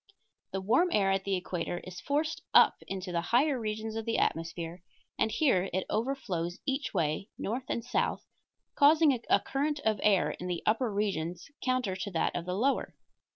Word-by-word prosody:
The 195 - -2
warm 255 - +3
air 195 -2 +3
at 195 0 0
the 195 -1 +1
equator 175 -1 -3
is 180 0 -8
forced 305 +6 -1
up - - +7
into 190 -1 -4
the 170 -1 0
higher 255 - +2
regions 220 0 -3
of 225 - -2
the 230 - 0
atmosphere, 165 +1 -2 0.4
and 220 - +3
here 215 - +2
it 185 +1 0
overflows 215 -8 -2
each 270 +1 -1
way, 165 +2 -1
north 245 +5 -3
and 235 - -2
south, 245 - -1 0.5
causing 305 0 +6 0.2
a - - +6
current 290 +2 -1
of 215 -2 +1
air 185 -8 +3
in 180 - -6
the 175 -2 -3
upper 225 +2 +2
regions 180 - -2
counter 255 -7 0
to 205 +1 -4
that 165 - 0
of 170 - -3
the 180 - -1
lower. 265 +7 0
210 Hz, 180 wpm, -30 LUFS, 180-255 Hz, 0.5 s, up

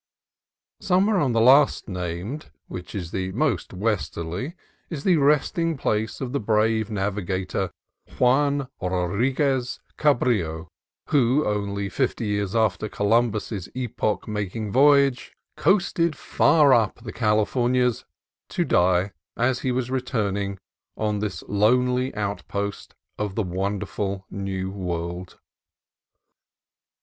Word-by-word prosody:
Somewhere 195 +3 +2
on 135 -7 +1
the 115 - +2
last 130 +6 +5
named 90 - -5 0.2
(which 90 +2 -8
is 90 -4 -4
the 95 0 -2
most 120 - 0
westerly) 90 - -3 0.3
is 150 -5 -5
the 180 -3 +4
resting 150 +3 +2
place 110 -4 -1
of 130 -3 -4
the 140 - 0
brave 110 0 +1
navigator 95 -2 -2 0.5
Juan 140 +2 +3
Rodriguez 120 - 0 0.2
Cabrillo, 100 - +1 0.4
who, 135 +1 +3
only 100 -1 -1
fifty 120 +2 -1
years 105 0 -1
after 110 -1 +1
Columbus's 105 -3 0
epoch 120 -4 -2
making 105 0 -3
voyage, 140 0 +4 0.2
coasted 170 -3 +2
far 150 -3 +4
up 110 -5 +3
"the 110 - -7
Californias," 120 +3 +1 0.5
to - - 0
die, 90 +2 +2 0.3
as 125 +2 +1
he 130 - -1
was 125 0 -2
returning, 100 -6 -1 0.4
on 105 -1 -1
this 105 -2 -4
lonely 125 +5 +2
outpost 100 0 -4 0.2
of 105 -2 -2
the 110 - 0
wonderful 95 +1 -3
new 95 -1 -3
world. 90 -1 -5
110 Hz, 110 wpm, -24 LUFS, 100-130 Hz, 0.5 s, last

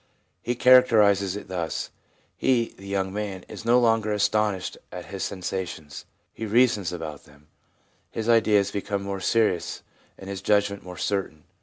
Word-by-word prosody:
He 120 - -2
characterises 105 -7 +5
it 105 - -7
thus: 85 -3 -3 0.2
' - - -38 0.2
He 120 -3 +1
(the 95 - -12
young 95 -1 -2
man) 100 -3 -4
is - - -9
no 120 +1 +5
longer 115 -2 +2
astonished 105 -2 0 0.2
at - - -7
his - - -7
sensations; 90 -5 -5 0.3
he 110 - -5
reasons 110 -5 +3
about 80 -4 -7
them. 75 0 -20 0.6
His 110 0 -4
ideas 105 -4 +4
become 100 0 -3
more 100 -1 -4
serious 105 -4 0 0.3
and 95 - -11
his 100 -1 -5
judgment 100 -1 +1
more 90 -1 -10
certain. 95 -6 -2
100 Hz, 155 wpm, -25 LUFS, 95-110 Hz, 0.6 s, characterises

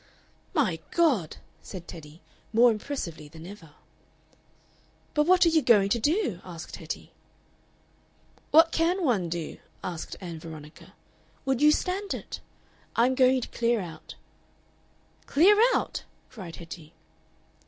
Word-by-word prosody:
"My 215 - +2
God!" 270 - +2 0.2
said 180 -3 -9
Teddy, 155 -1 -11 0.3
more 235 +2 +6
impressively 205 - -5
than 160 +2 -12
ever. 175 -6 -11 1.4
"But 300 0 +2
what 365 0 +6
are - - +6
you 320 -1 +3
going 210 -6 +5
to 235 - +2
do?" 290 - 0
asked 170 -3 -8
Hetty. - - -7 1.4
"What 325 +2 +6
can 345 +2 +1
one 200 - +1
do?" 165 -1 -4 0.3
asked 170 -3 -5
Ann 170 -4 -7
Veronica. 155 -1 -11 0.5
"Would 270 -1 0
you 300 0 +7
stand 385 +5 -1
it? - - -7 0.6
I'm 245 +3 +4
going 260 0 +4
to - - -4
clear 235 0 +1
out." 165 -5 -8 1.1
"Clear 360 +9 +6 0.2
out?" - - -2 0.3
cried 190 -9 -8
Hetty. 165 -2 -10
220 Hz, 125 wpm, -27 LUFS, -, 1.4 s, you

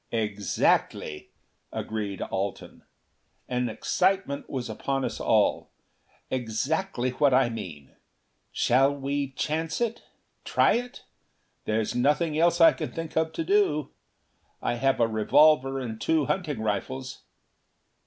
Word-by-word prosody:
"Exactly," 105 -7 0 0.4
agreed 105 -3 -4
Alten. 95 +1 -4 0.7
An 125 -1 -1
excitement 185 - 0
was 125 -3 -3
upon 135 +4 -2
us - - -4
all. - - +2 0.6
"Exactly 130 - -1
what 135 +1 +3
I 130 -2 +4
mean! 85 - -8 0.6
Shall 135 +3 +3
we 140 0 -2
chance 160 +3 -2
it? 235 -1 -1 0.4
Try - - +3
it? 245 +1 -4 0.6
There's 110 0 0
nothing 150 +5 +1
else 170 +2 +3
I 165 - +8
can - - -5
think 165 -1 -6
of 160 0 +1
to 330 - -2
do. 390 - +1 0.7
I - - -1
have 135 +3 +1
a 115 - +4
revolver 135 +5 +4
and 115 -4 -6
two 160 -3 +2
hunting 150 - -2
rifles." 130 +5 -3
135 Hz, 120 wpm, -27 LUFS, 115-160 Hz, 0.7 s, I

